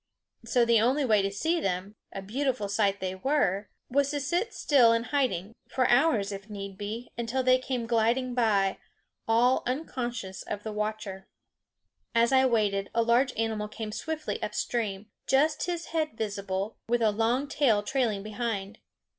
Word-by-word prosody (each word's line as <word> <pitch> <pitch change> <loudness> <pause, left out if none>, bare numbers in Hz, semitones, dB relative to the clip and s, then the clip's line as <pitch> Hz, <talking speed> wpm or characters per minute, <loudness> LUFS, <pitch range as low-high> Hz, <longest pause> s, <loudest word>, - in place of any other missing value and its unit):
So 235 +1 +2
the 230 -2 +4
only 265 +5 +2
way 215 -4 +4
to 195 - 0
see 320 +13 0
them 190 - -2 0.2
a 195 - -6
beautiful 245 0 -1
sight 200 -1 +1
they 185 0 -2
were 200 -3 0 0.2
was 280 +2 +2
to 290 0 -1
sit 345 - -1
still 245 -6 +4
in 230 0 +1
hiding, 230 -8 -1 0.2
for 255 -2 +1
hours 240 -6 +3
if 195 +1 -8
need 200 -2 -6
be, 215 +4 -6
until 240 +3 -1
they 255 0 +5
came 255 -2 -3
gliding 235 +2 +1
by, 205 -5 +2 0.5
all 240 +3 +4
unconscious 245 -7 -3
of 205 0 -5
the 220 - -4
watcher. 210 -2 -4 0.9
As 235 +1 +4
I 265 0 +5
waited 205 -4 +1
a 230 - +4
large 240 +4 +3
animal 220 -2 -1
came 215 0 -6
swiftly 310 +7 -4
up - - -4
stream, 210 -3 -2 0.2
just 300 +6 +2
his 345 -2 -4
head 310 -8 -1
visible, 200 -1 -3
with 240 -1 +2
a 215 - +4
long 230 +6 +1
tail 240 -8 +2
trailing 225 -5 0
behind. 215 -2 -4
230 Hz, 165 wpm, -28 LUFS, 205-260 Hz, 0.9 s, they